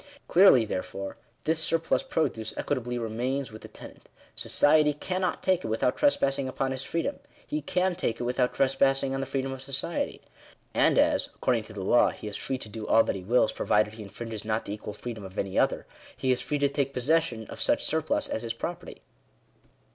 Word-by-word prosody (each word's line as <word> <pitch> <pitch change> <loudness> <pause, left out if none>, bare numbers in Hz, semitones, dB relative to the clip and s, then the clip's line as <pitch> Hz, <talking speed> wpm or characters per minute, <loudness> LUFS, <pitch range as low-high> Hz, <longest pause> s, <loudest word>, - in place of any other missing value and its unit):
Clearly, 170 - +7
therefore, 95 -1 -5 0.3
this 160 +1 +1
surplus 165 +5 +1
produce 155 - -2
equitably 125 -3 -2
remains 120 +3 -2
with 110 - -10
the - - -9
tenant: - - -13 0.2
society 150 0 +3
cannot 185 +4 -2
take 185 -1 +2
it - - -3
without 110 +3 +1
tres 290 -1 +3
passing 135 -1 0
upon 130 +1 -2
his 130 0 -3
freedom; 165 -1 -2 0.3
he 150 - -2
can 180 +5 +1
take 170 -10 -2
it - - -2
without 125 +1 +1
trespass 135 0 +2
ing 135 -1 -1
on 135 - -1
the 135 - -3
freedom 135 0 -2
of 135 -1 -6
society. 140 +5 -2 0.5
And - - +4
as, - - +3
according 120 -4 0
to 110 - -12
the 100 -3 -5
law, 120 - +5
he - - -8
is 105 - -4
free 135 - -2
to 120 - -8
do 105 0 -7
all 115 - +6
that - - -2
he 95 - -5
wills, 110 +5 +3
provided 105 0 +1
he 110 - -9
infringes 110 +1 -7
not 110 0 -1
the 100 - -4
equal 105 0 -6
freedom 110 0 -7
of 95 0 -10
any 95 -1 0
other, - - +1 0.3
he 130 - +1
is 125 - +1
free 150 - -1
to 140 0 +3
take 140 -1 -1
possession 125 -4 +1
of - - -9
such - - +2
surplus - - 0
as 110 - -3
his 115 -1 -3
property. 175 +8 -6
130 Hz, 210 wpm, -28 LUFS, 110-145 Hz, 0.5 s, Clearly